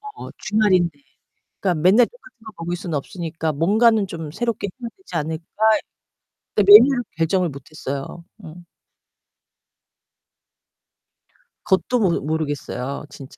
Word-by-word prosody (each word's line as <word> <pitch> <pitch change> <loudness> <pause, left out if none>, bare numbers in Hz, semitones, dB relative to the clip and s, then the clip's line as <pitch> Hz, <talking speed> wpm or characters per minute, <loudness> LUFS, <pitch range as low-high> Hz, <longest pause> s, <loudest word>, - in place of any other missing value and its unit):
어 - - -9
주말인데. 185 -8 +1 0.6
그러니까' 180 -5 0
맨날 210 +7 +6
똑같은 - - -20
거 215 - -8
먹을 175 +1 -3
순 170 -2 -6
없으니까 160 +1 -3
뭔가는 210 +7 +3
좀 165 -4 -7
새롭게 230 -1 -2
해야 235 - -5
되지 380 - -14
않을까?' 160 +1 -3 1.1
네, 210 - +5
메뉴를 240 +5 +8
결정을 170 +2 +1
못했어요. 140 +3 -7 0.2
음. 170 +2 -12 3.0
그것도 225 +6 +1
모르 185 -5 +2
모르겠어요. 145 -3 -4
진짜. 135 -2 -12
175 Hz, 270 characters per minute, -21 LUFS, 155-215 Hz, 3.0 s, 메뉴를